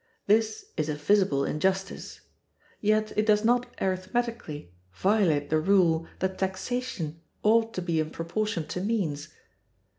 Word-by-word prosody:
This 220 +1 +2
is 155 -1 0
a 150 - -1
visible 150 -2 +2
injustice; 190 +5 -2 0.6
yet 215 0 +1
it 215 - +3
does 210 0 +4
not 245 +1 +3
arithmetically 185 - -2 0.2
violate 185 - +2
the 155 - +4
rule 170 -2 +3
that 190 0 -2
taxation 190 -4 -3 0.2
ought 225 +1 +4
to 185 - -2
be 170 -2 0
in 155 0 -1
proportion 170 +2 -2
to 180 - -3
means. 180 -9 -1
190 Hz, 130 wpm, -27 LUFS, 160-215 Hz, 0.6 s, does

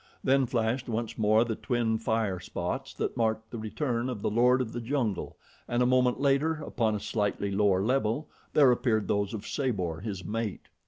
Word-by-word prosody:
Then 135 -1 +3
flashed 120 +1 -1
once 115 0 -2
more 110 +2 +4
the 115 - -2
twin 115 -3 0
fire 110 -4 0
spots - - -4
that - - -2
marked 110 -1 -1
the 115 - -5
return 120 +2 -2
of 115 -5 -5
the - - 0
lord 125 +3 +4
of 120 -3 -3
the 120 - -3
jungle 115 -5 -2 0.3
and 120 +1 +1
a - - +3
moment 125 0 +3
later, 140 +3 +2
upon 115 -7 -1
a - - -2
slightly 100 -1 -1
lower 100 -1 +2
level, 130 +4 0 0.3
there 140 -4 +6
appeared 115 -4 +1
those 100 -1 0
of 110 -3 -6
Sabor, 95 - -2
his 95 -2 -5
mate. 110 +1 -4
115 Hz, 190 wpm, -29 LUFS, 105-125 Hz, 0.3 s, there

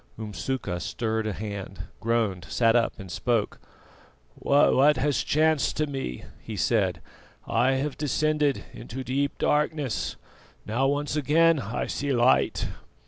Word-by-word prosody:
Umsuka 110 -2 -3
stirred 110 +2 -2
a - - -1
hand, 100 -1 -6 0.2
groaned, 110 -7 0
sat 115 - +3
up, 120 -1 +2
and 95 -2 -8
spoke: 115 +1 -1 0.7
"What 145 0 +4
has 145 +1 +1
chanced 155 -1 +2
to 155 - +2
me?" 135 - -5 0.2
he 110 - -7
said. 95 -5 +1 0.4
"I 130 +2 +2
have 135 +1 -2
descended 150 -1 +1
into 120 +3 -7
deep 140 +3 -1
darkness, 150 -3 0 0.5
now 120 +6 +1
once 145 +1 -1
again 155 +2 +4
I 115 -1 -3
see 145 0 -2
light." 125 0 +2
130 Hz, 130 wpm, -26 LUFS, 110-145 Hz, 0.7 s, What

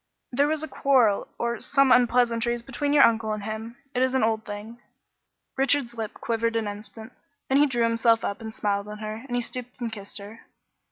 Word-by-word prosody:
"There 280 +3 +3
was 310 0 0
a - - -3
quarrel 255 -7 +2
or 235 -1 -2
some 275 -2 +3
unpleasantness 240 -1 +3
between 275 +3 -2
your 290 -1 +7
uncle 225 -1 +3
and 210 -1 -5
him; 220 +2 -6 0.2
it's 260 +1 +1
an 260 - +2
old 220 -1 +1
thing." 210 +3 -8 0.8
Richard's 270 -2 +1
lip 225 -3 -5
quivered 230 0 -1
an 225 -2 0
instant, 215 +2 -7 0.4
then 270 +1 +4
he 295 - +5
drew 240 -3 0
himself 230 0 +3
up 200 +3 -3
and 220 -1 -6
smiled 200 -1 -1
on 210 0 -7
her, 215 +1 -6
then 245 - -3
he 245 - +1
stooped 250 +1 -7
and 235 -2 -3
kissed 205 -2 -7
her. 210 +2 -9
230 Hz, 200 wpm, -26 LUFS, 220-250 Hz, 0.8 s, your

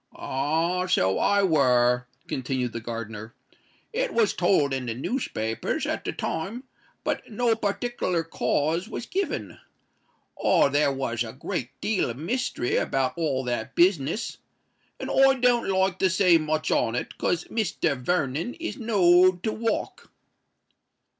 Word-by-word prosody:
"Ah! 165 +7 -1
so 95 - +2
I 200 0 +3
were," 125 -7 +3 0.2
continued 130 -2 -2
the 115 - -3
gardener. 115 -1 -7 0.6
"It - - -1
was 225 -3 +3
told 175 -6 +2
in 130 -2 -3
the 115 - -2
newspapers 115 - -2
at - - -3
the - - -1
time; 200 +10 -4 0.4
but - - -3
no 230 +1 +1
partickler 205 -5 -1
cause 165 +3 -1
was 240 - -5
given. 290 - -3 0.8
Oh! - - +4
there 145 0 +2
was 125 -4 -2
a 110 -1 -8
great 130 -1 -5
deal 210 - 0
of 120 - -5
mystery 170 - -1
about 135 -1 0
all 145 -6 -1
that 120 -3 -3
business; 170 - +1 0.6
and - - -4
I 270 0 +5
don't 245 -2 +2
like 190 -1 +1
to 190 - +3
say 180 -2 +4
much 155 0 -1
on 115 0 +1
it, - - -4
'cos 175 -1 0
Mr. 180 -8 0
Vernon 155 - -1
is 335 - -5
knowed 185 -6 +4
to 220 - 0
walk." 225 +1 -3
165 Hz, 140 wpm, -26 LUFS, 130-200 Hz, 0.8 s, I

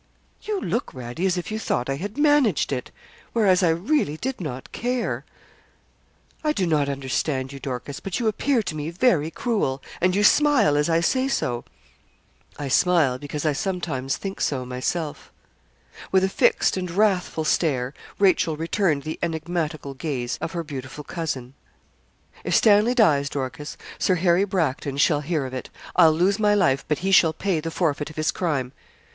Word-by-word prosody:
'You 420 -2 -2
look, 225 - -2
Radie, 125 +8 -3
as 185 -1 0
if 180 - -4
you 215 - -2
thought 125 - -1
I 135 0 -1
had 205 - -6
managed 290 - +3
it 125 -2 -3 0.4
whereas 200 -5 +4
I 175 - +4
really 170 - +1
did 260 +3 -4
not 135 -5 -6
care.' 230 - -2 1.2
'I 305 -1 +2
do 190 - 0
not 150 -4 +1
understand 135 0 -2
you, 140 - -8
Dorcas; 135 +1 -5
but 195 +3 -4
you 235 - 0
appear 235 +3 +1
to 170 - -4
me 150 +1 -3
very 170 - +2
cruel, 165 - -1 0.2
and 185 +1 +3
you 205 - +2
smile, 265 - +5
as 150 +2 +1
I 165 0 +3
say 260 +9 +1
so.' 120 - -1 0.9
'I 145 - -4
smile, 150 -4 +3
because 145 +2 -5
I 155 - +2
sometimes 145 -6 -2
think 195 -1 -6
so 130 -3 0
myself.' 145 +5 -4 0.8
With 190 0 +4
a 190 - +2
fixed 195 - +2
and 180 -1 -3
wrathful 185 -3 +1
stare 140 -5 0 0.2
Rachel 180 -5 +3
returned 165 -2 0
the 155 +1 -5
enigmatical 160 -3 -3
gaze 130 -3 -3
of 165 - -4
her 170 -1 -2
beautiful 140 -1 -7
cousin. 140 -6 -4 0.9
'If - - 0
Stanley 215 +3 +5
dies, 145 - +4
Dorcas, 145 +3 -5 0.2
Sir 185 - +2
Harry 180 +2 +3
Bracton 150 -8 -1
shall 145 +1 +3
hear 150 -2 -1
of 130 - -7
it. 130 - -5 0.3
I'll 165 -3 +7
lose 185 +6 +2
my 210 -1 +3
life, 140 -9 +2
but 155 +4 -1
he 195 - +1
shall 165 -4 +6
pay 180 0 -1
the 165 +1 -4
forfeit 155 -3 -1
of 155 - -12
his 155 0 +1
crime.' 140 -8 -2
165 Hz, 175 wpm, -24 LUFS, 140-195 Hz, 1.2 s, I'll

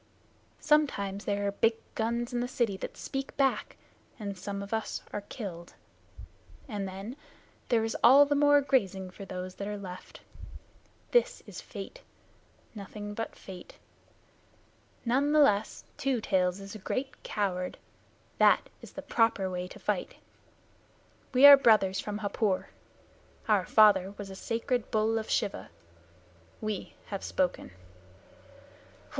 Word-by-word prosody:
Sometimes 205 -10 +1
there 205 0 -1
are 200 - +1
big 225 +3 +2 0.2
guns 235 +2 -2
in 240 - 0
the 245 - -1
city 235 -5 0
that - - -7
speak 270 0 -5
back, 270 -1 0 0.4
and 200 -2 -4
some 200 +1 -5
of 200 - -7
us 220 0 -3
are 205 - -3
killed, 190 -5 -8 0.9
and 205 -5 -4
then 195 +6 -7 0.5
there 230 -2 +3
is 225 - -2
all 275 +4 +8
the 290 - 0
more 290 0 +5
grazing 195 -9 0
for 195 - -10
those 185 -1 -6
that 200 - -6
are 210 0 -4
left. 185 -2 -10 0.9
This 485 - +2
is - - -9
Fate. - - -9 0.7
None 200 -3 -9 2.1
the 285 +5 +3
less, 215 -7 +3
Two 265 -3 0
Tails 185 -3 +1
is 195 +1 -9
a 215 - -8
great 265 +7 -4
coward. 185 -3 -2 0.6
That - - +5
is - - -12
the - - -7
proper 220 -5 +1
way 180 0 -3
to - - -12
fight. - - -2 1.2
We 260 +1 +6
are 285 0 +12
brothers 210 -7 +4
from 205 0 -4
Hapur. 205 -1 -1 0.8
Our 205 -4 +2
father 200 -3 +5
was 200 -1 -7
a - - -8
sacred 235 +3 -2
bull 220 +1 +1
of 220 - -7
Shiva. 200 - -1 0.9
We 215 -3 -4 0.2
have 195 - -4
spoken." 180 -1 -1
210 Hz, 135 wpm, -29 LUFS, 195-245 Hz, 2.1 s, are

